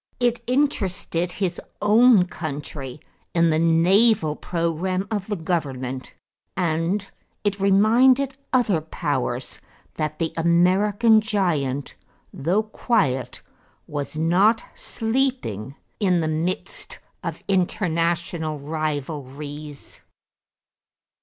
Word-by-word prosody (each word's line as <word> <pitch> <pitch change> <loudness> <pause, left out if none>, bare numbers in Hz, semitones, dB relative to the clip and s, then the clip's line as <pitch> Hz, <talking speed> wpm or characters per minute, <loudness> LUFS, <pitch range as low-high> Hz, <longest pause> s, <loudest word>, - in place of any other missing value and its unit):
It 240 -1 +1
interested 195 - 0
his 180 -3 -2 0.2
own 215 -1 +6
country 145 -5 -6 0.4
in 170 -1 +4
the 155 - +2
naval 170 +1 +4
program 180 +4 -2
of 205 -3 -2
the 210 - -1
government, 135 -7 -3 0.4
and 175 +3 0 0.4
it 200 -1 0
reminded 240 +8 +4 0.2
other 220 -10 +2
powers 130 -5 -3 0.4
that 155 0 -2
the 165 -1 -2
American 190 +6 +4
giant, 155 -11 -1 0.4
though 180 +9 +1
quiet, 135 - -1 0.4
was 145 +1 -5
not 190 +8 +3
sleeping 225 - -2 0.2
in 185 -5 +3
the 160 - 0
midst 160 +4 -3 0.3
of - - -5
international 170 -4 0
rivalries. 145 -1 -5
170 Hz, 90 wpm, -23 LUFS, 155-205 Hz, 0.4 s, own